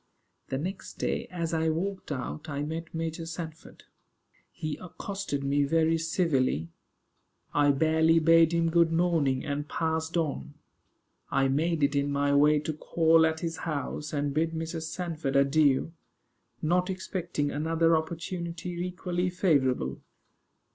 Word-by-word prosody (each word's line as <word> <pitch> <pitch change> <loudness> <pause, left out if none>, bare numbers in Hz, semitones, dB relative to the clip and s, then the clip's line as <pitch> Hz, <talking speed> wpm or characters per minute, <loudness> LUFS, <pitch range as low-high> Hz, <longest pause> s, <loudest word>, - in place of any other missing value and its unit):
The 130 - -1
next 185 +7 -5
day, - - -2
as 170 -2 -3
I 160 0 +1
walked 185 +3 -3
out, 145 +4 -5
I 145 0 -2
met 160 +2 -5
Major 165 0 -4
Sanford. 160 -1 -8 0.7
He 155 -1 -4
accosted 180 -4 -5
me 140 +1 +2
very 165 +2 +2
civilly. 140 - 0 0.8
I 145 0 +4
barely 160 +3 +3
bade 165 0 +5
him 165 -1 +1
good 170 -1 +4
morning, 165 -6 +1
and 145 +1 -3
passed 160 +1 -1
on. 145 - -2 0.7
I 135 0 +2
made 155 +3 +1
it 140 +1 +2
in 140 0 +1
my 140 0 +1
way 150 +1 +5
to 155 +1 -3
call 160 +1 +3
at 160 0 -3
his 165 -1 -3
house, 150 -1 -4
and 145 -1 -1
bid 160 +2 0
Mrs. 160 0 -4
Sanford 165 -6 -3
adieu; 140 +2 +3 0.7
not 180 +4 +2
expecting 180 -5 -2
another 165 +2 +2
opportunity 170 +1 -4
equally 180 0 -2
favorable. 135 - +1
160 Hz, 135 wpm, -28 LUFS, 145-170 Hz, 0.8 s, bade